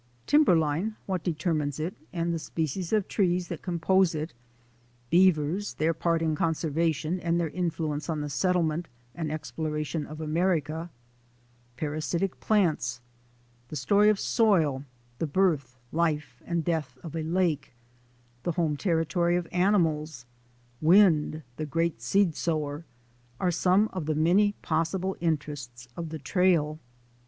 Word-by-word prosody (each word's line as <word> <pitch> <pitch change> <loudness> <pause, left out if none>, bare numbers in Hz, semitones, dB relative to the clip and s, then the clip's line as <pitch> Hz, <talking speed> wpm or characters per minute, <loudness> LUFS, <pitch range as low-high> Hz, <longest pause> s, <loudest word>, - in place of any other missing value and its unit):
Timberline, 180 - +3
what 185 -3 -2
determines 155 -4 -1
it, 165 +5 -2 0.2
and 170 -1 -1
the 165 - -2
species 160 +2 -3
of 215 -3 +2
trees 180 -3 +1
that 170 - -5
compose 180 0 +2
it; 155 +2 -4 0.8
beavers, 180 +2 +3
their 160 +2 +1
part 165 0 0
in 160 -1 +1
con 160 +2 +1
servation 160 +1 -1
and 170 0 +1
their 165 -3 -1
influence 160 -3 -2
on 155 -2 -1
the 150 - -3
settlement 170 0 +1 0.3
and 160 -3 -3
exploration 155 0 -3
of 155 +1 -9
America; 160 0 0 0.9
parasitic 155 +6 -2
plants; 160 - +1 0.7
the 155 - -7
story 200 +9 +4
of 210 -2 +2
soil; 165 - +2 0.4
the 165 - 0
birth, 145 -7 +1
life, 150 -6 -1
and 170 -2 -1
death 155 -7 -2
of 165 -1 -7
a 165 - -1
lake; 160 -5 0 0.7
the 175 - -1
home 160 -3 0
territory 170 +1 +1
of 175 -1 -1
animals; 160 - +1 0.6
wind, 160 -3 +4
the 155 - -2
great 165 -4 -1
seed 170 +7 +2
sower 155 -1 -2 0.3
— 120 0 -34
are 180 - +1
some 185 +5 +3
of 180 -5 -4
the 155 - +1
many 185 +7 +3
possible 175 +4 0
interests 145 -7 -3
of 165 -2 -5
the 160 - -5
trail. 155 0 +1
165 Hz, 140 wpm, -28 LUFS, 150-180 Hz, 0.9 s, story